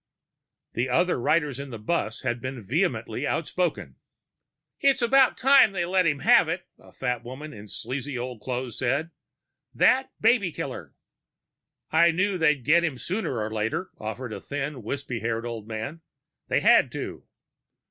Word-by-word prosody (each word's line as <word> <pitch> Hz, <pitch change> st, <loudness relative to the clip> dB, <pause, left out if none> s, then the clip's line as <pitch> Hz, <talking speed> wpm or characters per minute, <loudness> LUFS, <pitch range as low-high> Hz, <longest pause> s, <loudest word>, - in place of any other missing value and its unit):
The 125 Hz, +3 st, -1 dB
other 175 Hz, +4 st, +2 dB
riders 150 Hz, -2 st, +1 dB
in 140 Hz, 0 st, -6 dB
the 115 Hz, -, -6 dB
bus 110 Hz, -1 st, -2 dB
had 120 Hz, -2 st, -1 dB
been 130 Hz, -2 st, -5 dB
vehemently 155 Hz, -, -1 dB
outspoken. -, -, -2 dB, 0.8 s
"It's 275 Hz, -2 st, +3 dB
about 265 Hz, +2 st, +4 dB
time 265 Hz, -5 st, +6 dB
they 175 Hz, -3 st, -1 dB
let 185 Hz, 0 st, +2 dB
him 145 Hz, -2 st, 0 dB
have 235 Hz, -8 st, +5 dB
it," 175 Hz, +1 st, -3 dB
a -, -, -17 dB
fat 125 Hz, -2 st, -3 dB
woman 140 Hz, +5 st, -8 dB
in 105 Hz, 0 st, -11 dB
sleazy 130 Hz, +5 st, -5 dB
old 120 Hz, -2 st, -5 dB
clothes 125 Hz, -2 st, -4 dB
said. 140 Hz, +6 st, 0 dB, 0.6 s
"That 265 Hz, +1 st, +3 dB
baby 220 Hz, -5 st, +3 dB
killer!" -, -, -6 dB, 1.0 s
"I 170 Hz, +2 st, +5 dB
knew 185 Hz, +3 st, 0 dB
they'd 150 Hz, -6 st, +2 dB
get 170 Hz, +4 st, +5 dB
him 160 Hz, -7 st, -1 dB
sooner 185 Hz, -, -3 dB
or 110 Hz, 0 st, -3 dB
later," 110 Hz, -, -2 dB
offered 110 Hz, +2 st, -5 dB
a -, -, -7 dB
thin, 145 Hz, -1 st, -4 dB
wispy 130 Hz, +1 st, -4 dB
haired 115 Hz, +1 st, -2 dB
old 115 Hz, -3 st, -6 dB
man. 115 Hz, +9 st, -5 dB, 0.5 s
"They -, -, +1 dB
had -, -, +5 dB
to." -, -, -6 dB
140 Hz, 160 wpm, -26 LUFS, 120-175 Hz, 1.0 s, time